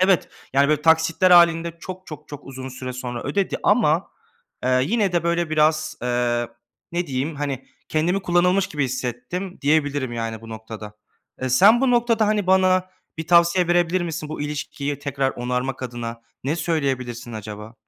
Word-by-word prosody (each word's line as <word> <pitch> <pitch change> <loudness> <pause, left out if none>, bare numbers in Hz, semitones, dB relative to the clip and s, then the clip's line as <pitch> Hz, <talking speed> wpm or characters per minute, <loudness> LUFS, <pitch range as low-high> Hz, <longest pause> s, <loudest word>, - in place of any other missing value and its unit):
Evet, 185 -1 +3 0.2
yani, 140 +1 +4
böyle, 150 -1 +1
taksitler 165 +3 +4
hâlinde 170 -1 +5
çok, 185 +1 -8
çok, 150 -1 -10
çok 145 -1 -9
uzun 130 -1 -7
süre 130 0 -6
sonra 125 -1 -5
ödedi 190 +8 -1
ama, - - +3 0.6
ııı, 130 0 +3
yine 200 - +1
de, 175 - +1
böyle, 170 -1 0
biraz, 155 0 +2
ııı, 120 -1 0 0.4
ne 175 0 -1
diyeyim, 140 +4 -2
hani, 140 -2 -4 0.2
kendimi 175 +5 0
"kullanılmış" 180 +2 +3
gibi 150 -7 -2
hissettim 130 +9 -4
diyebilirim, 145 -3 +1
yani, 115 -1 -4
bu 115 - -12
noktada. 110 -1 -8 0.5
Eee, 130 - 0
sen 200 - +6
bu 265 -1 +3
noktada, 235 -3 +3
hani, 210 -2 +1
bana 185 0 +3 0.3
bir 160 - -4
tavsiye 170 +1 +4
verebilir 175 +1 +2
misin 165 -2 -4
bu 155 - -6
ilişkiyi 145 -1 -4
tekrar 135 -1 -1
onarmak 125 +2 -3
adına, 120 -2 -5 0.2
ne 150 +5 0
söyleyebilirsin 130 -8 -2
acaba? 105 +1 -8
150 Hz, 160 wpm, -22 LUFS, 125-175 Hz, 0.6 s, sen